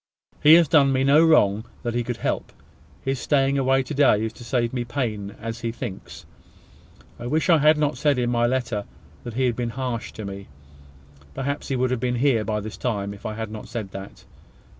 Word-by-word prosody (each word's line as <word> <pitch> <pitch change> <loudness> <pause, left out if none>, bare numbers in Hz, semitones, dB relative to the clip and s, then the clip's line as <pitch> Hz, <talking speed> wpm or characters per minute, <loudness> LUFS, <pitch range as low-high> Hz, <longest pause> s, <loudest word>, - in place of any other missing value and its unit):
He 155 +2 +8
has 170 -2 +5
done 145 -4 +4
me 130 0 +1
no 145 +4 +5
wrong 110 -10 +4 0.2
that 120 - -2
he 120 0 0
could 120 0 -4
help. - - -2 0.5
His 135 -1 -1
staying 140 -1 +2
away 135 0 +2
to 130 - -6
day 130 -7 +4
is 110 - -4
to 120 - -12
save 120 0 -1
me 125 -2 -1
pain, 110 -5 -3
as 115 +1 -6
he 115 -1 -2
thinks. 95 - -8 0.9
I 120 - -5
wish 155 +6 +1
I 165 - +6
had 155 +1 +5
not 150 -1 0
said 145 -4 +2
in 120 -1 0
my 120 0 +2
letter 120 -5 -1 0.4
that 120 -2 -7
he 130 +1 +1
has 125 - +2
been 120 0 -3
harsh 125 -1 -4
to 110 - -7
me. 100 0 -7 0.9
Perhaps 140 +2 -3
he 135 - -1
would 130 0 0
have 130 - 0
been 125 0 -1
here 120 -3 +2
by 105 -1 -2
this 110 +1 -7
time 100 -5 -2
if 100 +1 -8
I 110 - -5
had 110 -1 -5
not 110 -1 -8
said 110 -6 -5
that. 95 0 -10
120 Hz, 220 wpm, -24 LUFS, 110-135 Hz, 0.9 s, He